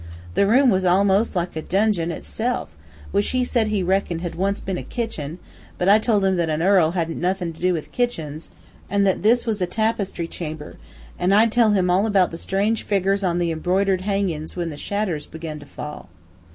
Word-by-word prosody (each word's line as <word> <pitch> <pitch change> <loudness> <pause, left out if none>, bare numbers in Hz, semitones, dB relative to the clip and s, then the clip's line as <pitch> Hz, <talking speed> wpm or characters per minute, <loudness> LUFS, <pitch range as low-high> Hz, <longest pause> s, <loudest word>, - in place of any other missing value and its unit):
The 200 - +3
room 255 +4 +5
was 190 -1 +1
almos' 195 +4 +3
like 175 -1 -2
a 160 - -3
donjon 195 -2 +1
itself, 225 - -3 0.4
which 200 0 +1
he 255 -1 +1
said 235 -3 +1
he 210 -3 0
reckoned 180 -2 0
had 175 -2 -4
once 195 +3 -1
been 190 -2 -4
a - - -4
kitchin, 180 - -4 0.4
but 180 - -1
I 205 +2 +7
told 215 -3 +1
him 190 -1 +2
that 170 -2 0
a 155 0 0
earl 175 -2 +4
hadn't 165 -2 -2
nothin' 180 -2 -1
to 160 - -16
do 180 +1 +3
with 165 -4 -4
kitchins, 160 -11 -3 0.4
an' 200 +1 +2
that 190 -2 +1
this 235 +4 +3
was 215 -4 -1
a 180 - +1
tapestry 205 -4 -1
chamber, 155 -3 -7 0.4
an' 180 +2 +2
I'd 220 +2 +5
tell 225 -2 +4
him 180 -3 +2
all 195 +4 +3
about 195 -4 +3
the 165 - -6
strange 205 +4 0
figgers 195 0 +1
on 175 -2 +1
the 170 -1 0
embroidered 185 +3 +1
hangin's, 190 -6 -2
when 170 -2 -3
the - - -7
shadders 185 -2 -2
begun 160 -1 -7
to 145 - -13
fall. 150 -11 -8
190 Hz, 205 wpm, -22 LUFS, 170-205 Hz, 0.4 s, I